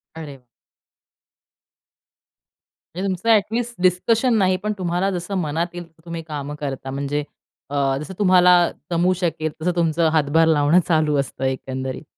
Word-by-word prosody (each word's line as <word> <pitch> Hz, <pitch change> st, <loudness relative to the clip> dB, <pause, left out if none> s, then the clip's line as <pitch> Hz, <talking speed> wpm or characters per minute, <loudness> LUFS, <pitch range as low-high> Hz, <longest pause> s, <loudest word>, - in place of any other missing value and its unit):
अरे! 150 Hz, -4 st, -9 dB, 2.6 s
म्हणजे 190 Hz, +2 st, -2 dB
तुमचं 190 Hz, +4 st, -2 dB
ॲटलीस्ट 230 Hz, +2 st, +1 dB
डिसकशन 225 Hz, +7 st, +2 dB
नाही 185 Hz, -2 st, +2 dB
पण 210 Hz, 0 st, -1 dB
तुम्हाला 180 Hz, +1 st, -1 dB
जसं 180 Hz, +2 st, -4 dB
मनात 160 Hz, +2 st, -1 dB
येईल 175 Hz, 0 st, -6 dB
तसं 165 Hz, 0 st, -27 dB
तुम्ही 170 Hz, -1 st, -5 dB
कामं 145 Hz, -1 st, -5 dB
करता, 135 Hz, -2 st, -5 dB
म्हणजे 140 Hz, +2 st, -2 dB, 0.5 s
अ, 140 Hz, -1 st, 0 dB
जसं 150 Hz, +7 st, -7 dB
तुम्हाला 180 Hz, -2 st, +5 dB, 0.4 s
जमू 175 Hz, +2 st, +2 dB
शकेल 165 Hz, -3 st, -2 dB
तसं 180 Hz, +3 st, +1 dB
तुमचं 165 Hz, -1 st, +2 dB
हातभार 160 Hz, +1 st, +3 dB
लावणं 155 Hz, +2 st, +4 dB
चालू 155 Hz, -3 st, +2 dB
असतं 135 Hz, -1 st, -4 dB
एकंदरीत. 130 Hz, +1 st, -4 dB
165 Hz, 140 wpm, -21 LUFS, 145-185 Hz, 2.6 s, तुम्हाला